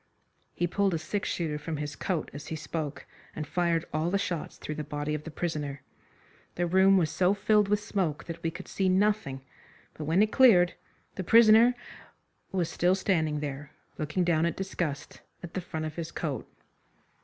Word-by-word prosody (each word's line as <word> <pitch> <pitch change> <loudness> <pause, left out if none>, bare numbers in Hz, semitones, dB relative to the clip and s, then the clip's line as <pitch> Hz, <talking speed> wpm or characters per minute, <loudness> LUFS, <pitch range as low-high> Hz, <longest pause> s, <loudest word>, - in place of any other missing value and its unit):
He 175 - +1
pulled 190 +1 +1
a - - +1
six 200 +5 -3
shooter 155 -3 -2
from 155 +1 -4
his 145 0 -4
coat 170 +1 -2
as 145 +1 -8
he 160 - -4
spoke, 155 -1 -5 0.3
and 155 - -4
fired 170 0 0
all 155 +2 0
the 200 - +2
shots 180 -5 -3
through 155 - -5
the 155 0 -4
body 145 +1 -3
of 150 0 -4
the - - -5
prisoner. 150 -4 -4 0.7
The 175 - 0
room 190 +2 +5
was 160 -5 +1
so 180 +4 +2
filled 210 0 +3
with 205 0 +2
smoke 175 -9 -1
that 165 -1 -7
we 165 - 0
could 165 - -9
see 190 -1 0
nothing, 190 -8 +1 0.5
but 155 - -6
when 165 +7 +4
it 215 - 0
cleared 195 -10 +6 0.4
the 190 - -4
prisoner 230 +4 +7 0.8
was 180 -3 0
still 180 +2 +2
standing 160 -6 0
there, 145 0 -6 0.3
looking 155 +4 0
down 170 -1 +2
in 170 - -1
disgust 160 -6 -4 0.2
at 175 - -8
the 185 - -2
front 160 -2 -5
of 155 +1 -6
his 165 -1 -4
coat. 140 -8 -4
170 Hz, 190 wpm, -28 LUFS, 150-190 Hz, 0.8 s, prisoner